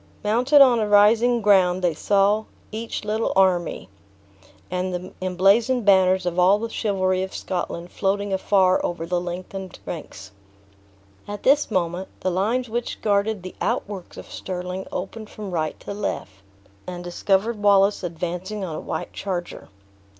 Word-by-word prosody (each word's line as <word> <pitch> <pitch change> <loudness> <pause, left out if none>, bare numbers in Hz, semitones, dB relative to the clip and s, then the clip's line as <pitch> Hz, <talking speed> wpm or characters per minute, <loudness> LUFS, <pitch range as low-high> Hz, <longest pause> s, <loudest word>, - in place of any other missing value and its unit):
Mounted 250 +7 +4
on 250 -4 +6
a 215 - 0
rising 225 +3 +4
ground, 185 -3 +4
they 175 -2 +2
saw 200 +6 +2 0.3
each 225 0 -5
little 220 +2 0
army, 180 - +2 0.8
and 185 0 -1
the 180 0 -6
emblazoned 200 +7 +2
banners 190 -2 +4
of 175 0 -1
all 185 +3 +5
the 225 +1 -5
chivalry 185 -3 0
of 190 0 -5
Scotland 175 -1 -4
floating 200 0 -1
afar 190 -1 +3
over 170 -1 -3
the 175 +1 -1
lengthened 185 +1 -6
ranks. 105 - -8 1.0
At 205 0 -6
this 285 +2 +4
moment, 180 -2 -1
the 185 - 0
lines 225 +8 0
which 240 +2 -4
guarded 205 -1 +1
the 185 - -7
outworks 195 -4 -3
of - - -8
Stirling 180 0 -5
opened 210 +4 -6
from 205 -3 -8
right 155 -3 -2
to - - -6
left, 200 - -3 0.6
and 175 -1 -6
discovered 195 +5 0
Wallace 200 0 +4
advancing 180 +3 -4
on 160 -4 -5
a - - -4
white - - -5
charger. 180 -3 -5
190 Hz, 150 wpm, -23 LUFS, 180-210 Hz, 1.0 s, on